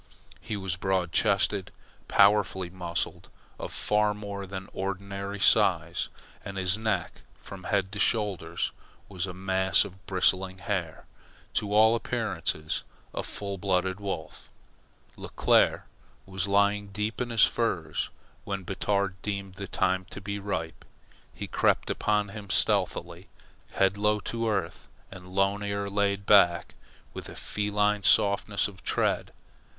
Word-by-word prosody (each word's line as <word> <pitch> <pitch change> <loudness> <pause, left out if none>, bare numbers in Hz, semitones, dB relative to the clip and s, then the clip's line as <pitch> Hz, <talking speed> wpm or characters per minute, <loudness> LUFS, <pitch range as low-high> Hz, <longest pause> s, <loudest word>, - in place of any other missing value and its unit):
He 105 - -4
was 95 -3 -3
broad 95 -2 0
chested, 100 0 +2 0.4
powerfully 100 -3 +4
muscled, 85 -2 -4 0.3
of - - -5
far 105 0 +1
more 100 -1 -6
than 95 0 -6
ordinary 100 +1 -4
size, - - +3 0.3
and 100 0 -6
his 95 0 +2
neck 110 0 -2 0.2
from 95 -2 -10
head 95 -2 0
to 105 - -6
shoulders 95 -7 0 0.4
was 95 -1 -3
a 90 - -6
mass 95 0 +3
of 95 +1 -12
bristling 95 0 +2
hair 95 -6 -3 0.5
to 105 - 0
all 110 +2 +6
appearances 80 -8 -2 0.3
a - - -2
full 100 -2 -5
blooded 95 0 0
wolf. 95 -6 -5 0.7
Leclere - - +2 0.4
was 95 0 -3
lying 100 +1 +3
asleep 105 +4 -2
in 125 - -2
his 115 -2 +4
furs - - -1 0.3
when 100 -1 -4
Batard 100 0 -1
deemed 100 -2 -4
the 100 +1 -7
time 95 +1 0
to 90 - -9
be 100 +1 -4
ripe. 90 -5 -4 0.5
He - - -6
crept - - +1
upon 105 -1 +1
him 100 -1 -9
stealthily, - - 0 0.4
head 95 +1 +2
low 105 +1 +2
to 115 +1 -2
earth 95 -5 -2 0.2
and 90 -1 -10
lone 95 +2 +1
ear 100 0 -2
laid 100 0 0
back, 85 -5 +5 0.4
with - - -7
a - - -9
feline 105 0 0
softness 100 +1 +3
of 95 -2 -12
tread. - - 0
100 Hz, 135 wpm, -28 LUFS, 95-105 Hz, 0.7 s, all